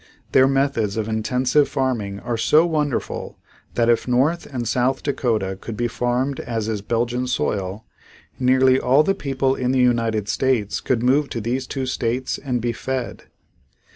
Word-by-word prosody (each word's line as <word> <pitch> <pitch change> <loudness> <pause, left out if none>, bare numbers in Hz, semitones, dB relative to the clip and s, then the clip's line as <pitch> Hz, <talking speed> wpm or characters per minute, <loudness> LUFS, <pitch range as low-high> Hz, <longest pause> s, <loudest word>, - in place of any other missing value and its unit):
Their 130 0 +5
methods 135 -7 0
of 110 -1 -1
intensive 125 +6 +1
farming 115 -8 -2
are 120 - -2
so 150 +8 +4
wonderful 150 -5 -2 0.4
that 115 -1 +2
if 120 0 +2
North 135 +8 +1
and 120 -3 -3
South 130 +3 0
Dakota 115 -9 -1
could 115 -3 -6
be 120 - 0
farmed 125 +3 -1
as 115 -2 -3
is 110 -2 -2
Belgian 120 +4 -1
soil, 100 -3 -2 0.5
nearly 130 0 +4
all 135 +4 +4
the 195 - +2
people 135 -4 -1
in 130 -1 -1
the 130 - +2
United 115 -4 +1
States 115 -3 0
could 120 -2 0
move 140 +3 +3
to 115 - -4
these 125 +4 -2
two 135 -2 -3
states 130 0 -2
and 125 -4 -2
be 120 +1 0
fed. 130 +2 -4
125 Hz, 165 wpm, -22 LUFS, 115-130 Hz, 0.5 s, Their